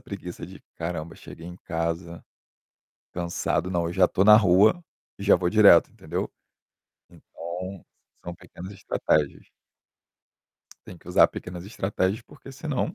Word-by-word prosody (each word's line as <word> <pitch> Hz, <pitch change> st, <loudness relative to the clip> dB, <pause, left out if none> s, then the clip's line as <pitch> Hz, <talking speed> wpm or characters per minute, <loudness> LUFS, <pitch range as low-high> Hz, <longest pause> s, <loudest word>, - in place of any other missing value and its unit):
preguiça 100 Hz, -7 st, -8 dB
de: -, -, -13 dB, 0.2 s
"Caramba, 85 Hz, 0 st, -5 dB
cheguei 85 Hz, -, -12 dB
em 90 Hz, 0 st, -9 dB
casa, 85 Hz, +1 st, -4 dB, 0.9 s
cansado". 90 Hz, +1 st, -2 dB
Não, 85 Hz, -1 st, -1 dB
já 95 Hz, 0 st, +4 dB
estou 95 Hz, -, +1 dB
na 105 Hz, 0 st, +9 dB
rua 105 Hz, -, +4 dB, 0.4 s
e 100 Hz, -, -8 dB
já 100 Hz, -, +6 dB
vou 90 Hz, -, -1 dB
direto, 100 Hz, -5 st, +6 dB
entendeu. -, -, -5 dB, 0.8 s
Então, 90 Hz, +3 st, -8 dB, 0.5 s
sa -, -, -16 dB
são 85 Hz, -, -5 dB
pequenas 95 Hz, +4 st, -11 dB
estratégias. 75 Hz, -6 st, -1 dB, 1.4 s
Tem -, -, -11 dB
que 85 Hz, -, -16 dB
usar 90 Hz, -, +5 dB
pequenas 90 Hz, 0 st, -8 dB
estratégias 100 Hz, 0 st, -2 dB
porque 135 Hz, -, -14 dB
senão 140 Hz, -1 st, -3 dB
90 Hz, 135 wpm, -25 LUFS, 85-100 Hz, 1.4 s, na